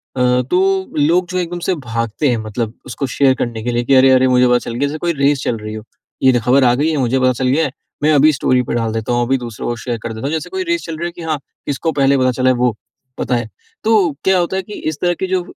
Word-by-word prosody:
अ, 125 -1 +2
तो 190 +1 +1
लोग 170 +5 +2
जो 185 - -2
एकदम 175 0 -3
से 185 - +2
भागते 115 +5 -1
हैं 120 - +1
मतलब 110 +1 -4
उसको 130 +2 -4
शेयर 135 -2 +5
करने 115 -2 -3
के 120 - -1
लिए 120 0 0
कि 135 +3 +3
अरे-अरे 130 0 +5
मुझे 125 0 +4
पता 125 0 +4
चल - - -4
गया, 135 +5 0
जैसे 150 +2 -4
कोई 170 -1 0
रेस 140 -1 +2
चल 115 - -1
रही 110 0 -7
हो। 110 0 -7 0.4
ये 130 - +6
जो 120 - +2
ख़बर 130 +2 +4
आ 120 - +5
गई 145 +5 +1
है 155 - -1
मुझे 130 0 +1
पता 130 0 +3
चल 125 +1 -1
गया 150 +5 +2
है। 135 - -3 0.3
मैं 155 - +4
अभी 150 +2 +5
स्टोरी 130 -1 +2
पर - - -4
डाल 115 -1 -1
देता 115 +1 -3
हूँ, 120 - +1
अभी 135 +2 +1
दूसरों 120 -4 -6
को 120 - -1
शेयर 120 -2 -2
कर 115 -1 -4
देता 110 +4 -6
हूँ। 145 - -1
जैसे 160 - -3
कोई 380 0 -3
रेस 340 -1 -1
चल 165 -2 -5
रही 170 - -3
है - - -6
कि 170 - -11
हाँ 160 -3 -2 0.3
इसको 145 +3 -1
पहले 140 -1 +2
पता 130 -1 +2
चला 130 +1 +1
है, 130 - +3
वो 120 -2 +1 0.4
पता 125 - -1
है। 120 -2 -2 0.4
तो 215 -6 +3
क्या 190 0 +3
होता 175 +2 -1
है - - 0
कि 210 - -10 0.2
इस 155 - -5
तरह 175 -1 +2
की 190 - -1
जो 185 0 0
130 Hz, 295 wpm, -17 LUFS, 120-160 Hz, 0.4 s, ये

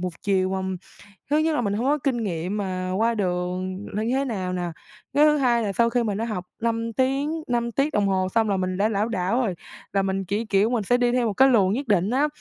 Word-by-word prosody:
1 180 0 -2
chiều 190 -2 +1
mà 190 - -1 0.7
thứ 295 - +3
nhất 310 0 +2
là 245 - +1
mình 200 -3 -1
hông 225 +5 -1
có 295 +2 +3
kinh 245 -5 0
nghiệm 180 +1 -2
mà 185 -2 -3
qua 230 +2 +2
đường 185 0 -2
nên 215 +1 -1
như 250 - +1
thế 275 +1 +1
nào 190 -7 -3
nè. 180 -1 -2 0.5
Cái 295 +1 +5
thứ 300 0 +4
hai 240 -4 +2
là 200 - -2
sau 235 +3 +3
khi 240 0 +1
mình 205 -2 -1
đã 225 - -1
học 200 -6 -4 0.2
5 230 0 -1
tiếng, 275 +6 0
5 235 -1 0
tiết 275 +5 0
đồng 205 -1 +2
hồ 185 -1 +1
xong 220 -2 +3
là 195 - +1
mình 185 0 -2
đã 210 +2 +2
lảo 215 +1 0
đảo 200 +4 0
rồi, 200 -7 -1 0.4
là 195 - +3
mình 195 0 -1
chỉ, 205 +5 -2
kiểu, 205 +1 +2
mình 235 -3 0
sẽ 245 +5 +2
đi 245 -1 +2
theo 245 -1 +1
một 210 - -1
cái 265 +6 +5
luồng 200 -6 +4
nhất 270 +4 -3
định 200 -2 +2
á, 275 +5 +2
215 Hz, 265 wpm, -24 LUFS, 190-245 Hz, 0.7 s, Cái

